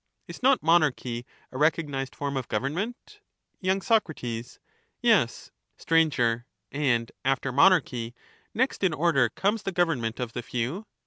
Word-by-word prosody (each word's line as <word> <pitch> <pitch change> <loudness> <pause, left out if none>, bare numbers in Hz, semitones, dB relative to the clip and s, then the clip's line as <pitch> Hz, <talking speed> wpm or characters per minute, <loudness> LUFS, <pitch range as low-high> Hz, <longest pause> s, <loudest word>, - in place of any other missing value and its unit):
Is - - -10
not 265 +1 +4
monarchy 140 -7 +1 0.2
a 130 - -6
recognized 145 -4 0
form 140 -1 -3
of 130 -2 -3
government? 170 - -4 0.4
There 185 0 +1
are - - +3
y - - -3
SoC' 220 -3 +2 0.9
Yes. - - +2 0.3
*;^tf'' 165 -1 +3
Sir. 120 0 +1 0.3
And, 130 -5 0
after 135 0 0
monarchy, 125 -6 +3 0.4
next 260 -2 -1
in 180 -5 +2
order 145 -6 +3
comes 205 - 0
the 195 - -3
govern 170 -6 +1
govern - - -6
ment 115 +1 -3
of 125 -2 -4
the 120 - -3
few 125 - -4
145 Hz, 155 wpm, -27 LUFS, 125-175 Hz, 0.9 s, not